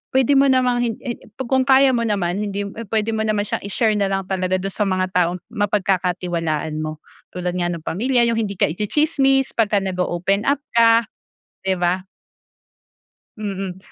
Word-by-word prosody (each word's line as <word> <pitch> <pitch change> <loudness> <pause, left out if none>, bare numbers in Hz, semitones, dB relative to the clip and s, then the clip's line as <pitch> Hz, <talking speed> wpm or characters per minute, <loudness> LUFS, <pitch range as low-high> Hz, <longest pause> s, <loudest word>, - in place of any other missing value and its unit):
pwede 265 +1 +4
mo 275 - +5
namang 250 -2 +2
hin 225 - -1
he 245 -3 -4 0.2
kung 260 +2 +1
kaya 265 0 +6
mo 235 -2 0
naman 195 -3 -1
hindi 200 0 -3
mo 200 - -6
eh, 230 - -7
pwede 220 +1 0
mo 220 - -2
naman 210 -1 +1
siyang - - -3
i-share 215 +2 +1
na 200 - +2
lang 195 0 -1
talaga 185 0 0
dun 195 - -3
sa 205 +1 -1
mga 185 -1 0
taong 180 0 +1
mapagkakatiwalaan 180 -6 -1
mo. 155 0 -5 0.3
Tulad 180 0 -2
nga 175 -1 0
no'ng 170 -2 -4
pamilya, 240 +9 +1
'yung 230 -1 +1
hindi 200 -3 -2
ka 150 - +1
itsitsismis 270 - +1
pagka 210 -3 +1
nag-o-open 185 +2 -1
up 285 0 +2
ka, 230 0 +5 0.6
'di 190 - +1
ba? 180 +2 0 1.3
Mm. 195 -3 -4
200 Hz, 175 wpm, -21 LUFS, 180-235 Hz, 1.3 s, kaya